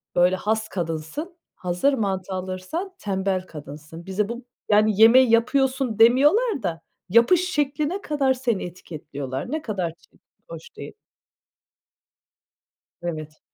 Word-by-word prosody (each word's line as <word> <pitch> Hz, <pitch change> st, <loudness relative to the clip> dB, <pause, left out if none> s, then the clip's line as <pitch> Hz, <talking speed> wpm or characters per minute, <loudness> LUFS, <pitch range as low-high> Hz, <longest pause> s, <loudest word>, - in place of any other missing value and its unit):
böyle, 180 Hz, +1 st, +4 dB
has 220 Hz, +3 st, -1 dB
kadınsın, 175 Hz, -, -4 dB, 0.2 s
hazır 180 Hz, +11 st, 0 dB
mantı 195 Hz, -5 st, -2 dB
alırsan 185 Hz, -, -4 dB
tembel 190 Hz, -2 st, -1 dB
kadınsın. 150 Hz, +2 st, -10 dB
Bize 200 Hz, +3 st, -1 dB
bu 240 Hz, +1 st, -6 dB, 0.2 s
yani, 215 Hz, 0 st, +3 dB
yemeği 240 Hz, +1 st, +7 dB
yapıyorsun 260 Hz, 0 st, +2 dB
demiyorlar 285 Hz, -, +4 dB
da 165 Hz, -2 st, -3 dB, 0.3 s
yapış 340 Hz, -, +4 dB
şekline 300 Hz, +6 st, -1 dB
kadar 280 Hz, -3 st, +1 dB
seni 245 Hz, -6 st, -1 dB
etiketliyorlar. 145 Hz, -, -6 dB
Ne 315 Hz, -, -2 dB
kadar 190 Hz, -, -3 dB
çirkin, -, -, -28 dB, 0.3 s
hoş 165 Hz, -1 st, -10 dB
değil. -, -, -8 dB, 2.1 s
Evet. 155 Hz, -3 st, -5 dB
210 Hz, 115 wpm, -24 LUFS, 175-265 Hz, 2.1 s, yemeği